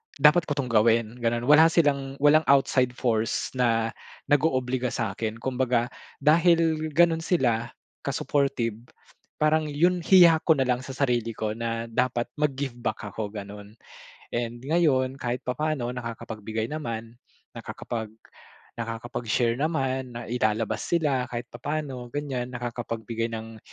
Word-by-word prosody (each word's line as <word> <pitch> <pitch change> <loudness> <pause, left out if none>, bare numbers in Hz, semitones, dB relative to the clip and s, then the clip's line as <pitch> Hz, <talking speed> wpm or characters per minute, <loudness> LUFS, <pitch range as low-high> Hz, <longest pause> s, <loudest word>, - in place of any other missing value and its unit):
"Dapat 150 +4 +5
ko 145 - -1
'tong 130 -4 -2
gawin" 115 +1 +3
ganon, 120 0 0
wala 155 +2 +8
silang 140 -5 +1
walang 155 +2 +6
outside 130 -2 +3
force 115 -4 0
na 115 -2 +2 0.4
nag-oobliga 130 -4 +1
sa'kin, 110 0 -3
kumbaga 125 -2 0 0.3
dahil 165 -1 +3
ganun 165 0 +4
sila 120 -10 +1 0.4
ka-supportive, 125 -5 -1 0.5
parang 155 0 +2
yun 175 +4 +2
hiya 170 -3 +6
ko 160 -3 +3
nalang 130 -1 +1
sa 135 0 -7
sarili 120 -4 0
ko 110 -1 -2
na 115 0 -3
dapat 120 +1 0
mag-give 140 -3 -1
back 110 - -3
ako 105 0 -4
ganon. 105 +1 -9 0.5
And 120 +1 -3
ngayon 135 -4 +1
kahit 125 -1 -3
papaano 130 -2 -2
nakakapagbigay 115 -1 -5
naman, 115 -5 -5 0.3
nakakapag 110 -3 -6 0.7
nakakapag 115 +1 -5
share 115 +1 +2
naman, 130 -5 -1
na 120 - -5
ilalabas 110 -2 0
sila 145 -7 +1
kahit 120 0 -4
papaano 130 -1 -4
ganyan 135 -2 -3
nakakapagbigay 115 -1 -3
ng 115 -1 -7
125 Hz, 125 wpm, -26 LUFS, 115-145 Hz, 0.7 s, wala